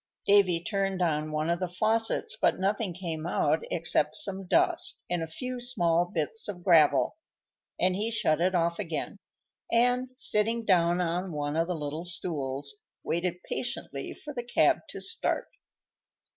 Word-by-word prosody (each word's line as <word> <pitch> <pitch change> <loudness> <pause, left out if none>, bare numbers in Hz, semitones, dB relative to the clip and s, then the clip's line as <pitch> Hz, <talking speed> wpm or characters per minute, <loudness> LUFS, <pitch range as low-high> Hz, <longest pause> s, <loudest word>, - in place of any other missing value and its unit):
Davy 185 -4 +4
turned 195 0 -1
on 155 -3 0
one 155 +2 0
of 170 - 0
the 185 - -1
faucets, 220 +4 +1
but - - +2
nothing 200 +1 0
came 165 -2 -5
out - - +2
except - - +2
some 195 -10 -1
dust - - +1
and 175 -1 0
a 165 - -3
few 250 - -5
small 175 -9 +1
bits 175 +5 -1
of 180 -4 -6
gravel, 155 - +4 0.6
and 185 0 +2
he 210 +4 -1
shut 165 -8 +1
it 185 +1 +2
off 170 0 +1
again, 165 0 -3 0.5
and, 245 +2 +2
sitting 225 -1 0
down 175 -3 +3
on 180 +2 -1
one 145 -1 -3
of 165 +1 +1
the 180 - -2
little 150 +1 -4
stools, 145 -2 -2 0.2
waited 175 +1 -2
patiently - - -4
for 300 - -9
the 245 - -3
cab 240 0 +3
to - - -7
start. - - -2
180 Hz, 160 wpm, -28 LUFS, 165-210 Hz, 0.6 s, Davy